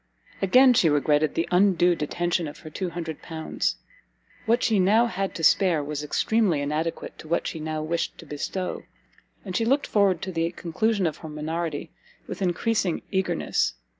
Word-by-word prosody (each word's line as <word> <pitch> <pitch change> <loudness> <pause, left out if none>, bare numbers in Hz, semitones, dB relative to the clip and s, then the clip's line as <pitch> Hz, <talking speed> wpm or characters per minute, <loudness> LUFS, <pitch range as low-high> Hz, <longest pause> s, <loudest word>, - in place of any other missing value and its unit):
Again 255 +7 +6
she 175 -8 +4
regretted 150 +1 +2
the 165 - 0
undue 180 -1 +4
detention 175 +2 -1
of 145 - -9
her 155 - -10
L200. 160 - -3 0.7
What 235 +2 +3
she 215 -3 +3
now 210 +6 +4
had 195 -4 -3
to 165 - -5
spare 170 -2 +4
was 150 0 -4
extremely 195 +2 +1
inadequate 150 +3 -3
to - - -10
what 170 +2 0
she 160 - -4
now 155 0 -3
wished 170 +2 -2
to - - -12
bestow, 170 +5 -4 0.6
and 185 -2 -5
she 225 - +2
looked 270 +5 +2
forward 195 -5 +2
to 190 - -3
the 165 -1 0
conclusion 200 +4 0
of 160 - -1
her 160 - -9
minority 155 0 -4 0.3
with - - -7
encreasing 190 0 0
eagerness. 175 - 0
170 Hz, 165 wpm, -25 LUFS, 155-195 Hz, 0.7 s, Again